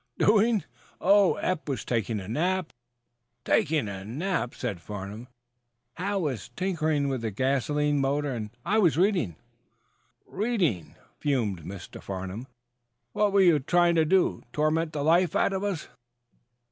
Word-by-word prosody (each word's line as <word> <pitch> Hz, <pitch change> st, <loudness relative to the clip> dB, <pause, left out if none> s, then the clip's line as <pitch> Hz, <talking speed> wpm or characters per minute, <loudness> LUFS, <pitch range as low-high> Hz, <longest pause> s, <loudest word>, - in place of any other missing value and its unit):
"Doing? 215 Hz, 0 st, +3 dB, 0.4 s
Oh, 200 Hz, -1 st, +5 dB
Eph 180 Hz, -4 st, -2 dB
was 135 Hz, -3 st, -3 dB
taking 115 Hz, -2 st, -1 dB
a 95 Hz, -, -8 dB
nap 175 Hz, -, -1 dB, 0.4 s
" 120 Hz, 0 st, -52 dB
"Taking 150 Hz, -6 st, +2 dB
a 95 Hz, -1 st, -6 dB
nap?" 140 Hz, -, -2 dB
"Hal 120 Hz, -, -6 dB
was 130 Hz, -10 st, -3 dB
tinkering 160 Hz, -6 st, 0 dB
with 135 Hz, -3 st, -2 dB
the 115 Hz, -, -2 dB
gasoline 140 Hz, +5 st, 0 dB
motor, 140 Hz, +1 st, 0 dB
and 110 Hz, -3 st, -4 dB, 0.2 s
I 210 Hz, +5 st, +2 dB
was 175 Hz, -7 st, +3 dB
reading." 175 Hz, -, +2 dB, 0.9 s
"Reading?" 175 Hz, -, -1 dB, 0.2 s
fumed 115 Hz, -, 0 dB
Mr. 90 Hz, +2 st, -9 dB
Farnum. 95 Hz, +5 st, -6 dB, 0.7 s
"What 210 Hz, -1 st, +2 dB
were 200 Hz, 0 st, +4 dB
you 170 Hz, -5 st, +5 dB
trying 175 Hz, +5 st, +3 dB
to 165 Hz, -1 st, +4 dB
do? 185 Hz, +3 st, +2 dB
Torment 155 Hz, +2 st, 0 dB
the 145 Hz, -2 st, -2 dB
life 175 Hz, +4 st, +3 dB
out 200 Hz, -, +2 dB
of 190 Hz, +1 st, -2 dB
us?" 195 Hz, -6 st, -2 dB
145 Hz, 135 wpm, -27 LUFS, 120-180 Hz, 0.9 s, Oh